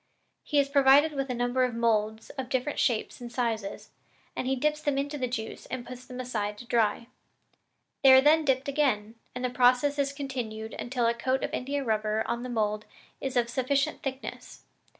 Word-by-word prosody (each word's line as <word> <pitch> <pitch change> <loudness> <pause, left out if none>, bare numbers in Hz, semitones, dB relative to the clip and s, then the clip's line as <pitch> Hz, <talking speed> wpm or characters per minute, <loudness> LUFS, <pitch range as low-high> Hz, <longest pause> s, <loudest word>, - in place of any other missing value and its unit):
He 295 - -1
is 280 -1 +4
provided 280 +2 +5
with 275 -2 -3
a 250 - -1
number 245 +2 +1
of 250 -2 0
moulds 220 -1 0
of 265 -3 -6
different 265 +2 -1
shapes 235 0 0
and 240 -1 -7
sizes, 225 -5 -3 0.4
and 255 - -3
he 265 - +1
dips 300 +3 0
them 290 -2 0
into 285 +2 -2
the 260 -3 -1
juice 225 -2 -5
and 255 -2 -5
puts 255 0 -9
them 255 -1 -8
aside 210 -5 -3
to 240 - -10
dry. 230 -1 +1 1.0
They 270 - +8
are 260 - +9
then 310 +3 +5
dipped 265 -1 +1
again, 255 -7 0 0.2
and 250 0 -2
the 250 - -1
process 250 +3 +3
is 280 0 +1
continued 245 -6 -5
until 245 -1 -1
the 230 - +3
coat 260 +3 -1
of - - -3
India 280 +2 -2
rubber 215 -2 0
on 235 - -2
the 250 - -5
mould 215 -2 -1 0.4
is 265 -1 -2
of 240 -1 +3
sufficient 275 +4 0
thickness. 265 0 -7
255 Hz, 195 wpm, -28 LUFS, 235-275 Hz, 1.0 s, are